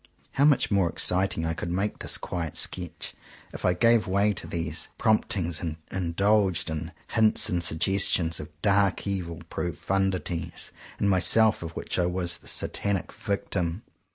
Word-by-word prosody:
How 140 - +3
much 145 -6 +3
more 95 -4 +3
exciting 90 -1 0
I 80 - 0
could 85 - -4
make 95 +4 -1
this - - +1
quiet 85 -4 -4
sketch, 90 -2 -1 0.4
if - - -8
I 90 - +3
gave 115 +3 +4
way 100 +2 +2
to - - -4
these 80 -2 -2
prompt 110 -1 +2
ings 85 -3 -2
and 80 -2 -4
indulged 95 0 +1
in 80 +1 -4 0.2
hints 110 -1 +3
and 90 -1 0
suggestions 85 0 +1
of 75 - -7
dark 100 -2 +2
evil 90 -5 -3
profundities 90 -1 -2 0.3
in 100 - +1
myself 105 +4 +5
of 85 -1 -7
which - - -3
I 90 - +2
was 90 -1 -2
the - - -17
Satanic 100 -4 -2
victim! 100 -3 -2
90 Hz, 155 wpm, -27 LUFS, 85-100 Hz, 0.4 s, myself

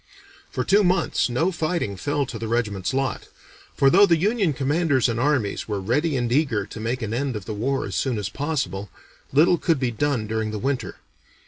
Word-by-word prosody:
For - - -2
two 205 +2 +4
months 180 -7 +1
no 160 +10 +1
fighting 160 - -2
fell 145 +8 -1
to 115 - -7
the 115 - -4
regiment's 105 -5 -1
lot, 135 0 -2 0.5
for 135 0 +4
though 200 +3 +7
the 170 -2 +4
Union 200 0 +1
commanders 140 0 +1
and 115 -1 -1
armies 130 -6 0
were 105 -2 -2
ready 135 - 0
and 120 -1 -1
eager 125 -7 +1
to 110 - -9
make 120 +3 -2
an 110 0 -3
end 130 0 -1
of 105 -3 -6
the 110 - -4
war 135 +6 -1
as - - -6
soon 130 -4 0
as 105 -1 -2
possible, 130 -7 -3 0.4
little 165 +5 +4
could 165 -5 +1
be 130 -2 0
done 125 -1 -1
during 110 0 -2
the 110 - -4
winter. 135 +4 -2
130 Hz, 205 wpm, -23 LUFS, 110-150 Hz, 0.5 s, though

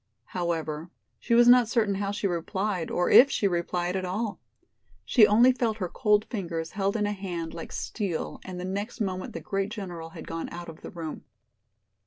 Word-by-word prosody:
However, 165 -2 -2 0.3
she 235 - +1
was 240 0 +6
not 245 -2 +7
certain 220 -4 +2
how 195 0 -2
she 205 0 -3
replied 190 +1 -1
or 175 - +1
if 275 - +9
she 205 - +1
replied 175 0 -1
at 190 - -1
all. 200 +4 -3 0.7
She 220 -5 +6
only 235 +5 +6
felt 235 -4 -1
her 185 -4 -2
cold 210 +3 +2
fingers 170 -7 -4
held 200 +1 -1
in 210 - +1
a 205 - 0
hand 180 -5 -4
like 165 - -7
steel 195 -7 -3
and 185 -1 -7
the 180 - -4
next 200 +6 -4
moment 185 -3 -3
the - - -5
great 195 0 -2
general 180 -7 -6
had - - -10
gone 165 0 -5
out 175 0 -7
of 160 - -11
the - - -8
room. 165 -3 -7
190 Hz, 195 wpm, -27 LUFS, 175-210 Hz, 0.7 s, if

